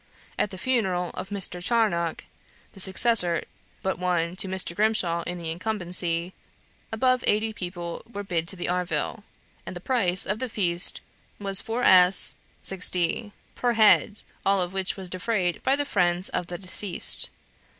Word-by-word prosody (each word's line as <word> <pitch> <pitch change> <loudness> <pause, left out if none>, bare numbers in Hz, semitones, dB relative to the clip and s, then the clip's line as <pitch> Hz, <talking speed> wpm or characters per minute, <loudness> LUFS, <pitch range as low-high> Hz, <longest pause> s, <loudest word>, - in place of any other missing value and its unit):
At - - 0
the 190 - -9
funeral 190 -6 -1
of 190 - -7
Mr. 190 -3 -1
Charnock 180 -8 0 0.5
(the - - -20
next - - +8
successor 190 -3 +3 0.4
but 190 -2 -2
one 175 -1 -1
to 195 - 0
Mr. 185 -2 -2
Grimshaw 195 -5 +1
in 180 - -4
the 165 -2 -5
incumbency), 175 -2 -2 0.6
above 255 +3 +1
eighty 220 +1 +1
people 175 -3 -6
were 205 -2 -6
bid 170 -4 -2
to 190 - -2
the 175 - -4
arvill, 180 +5 -2 0.4
and - - -8
the - - -6
price 190 -5 +1
of 210 +2 -2
the 255 - -4
feast 175 -4 +1 0.4
was 195 -1 +2
4s. 190 -6 +4 0.3
6d. 185 +3 +2 0.2
per 245 -1 -1
head, 215 -1 +5 0.2
all 195 0 +2
of 180 0 -2
which 190 0 -2
was 190 -1 -6
defrayed 185 -2 -2
by 265 - +2
the 290 0 -2
friends 180 -5 +1
of 175 - -3
the 175 - -6
deceased. 185 0 +1
185 Hz, 160 wpm, -25 LUFS, 175-215 Hz, 0.6 s, next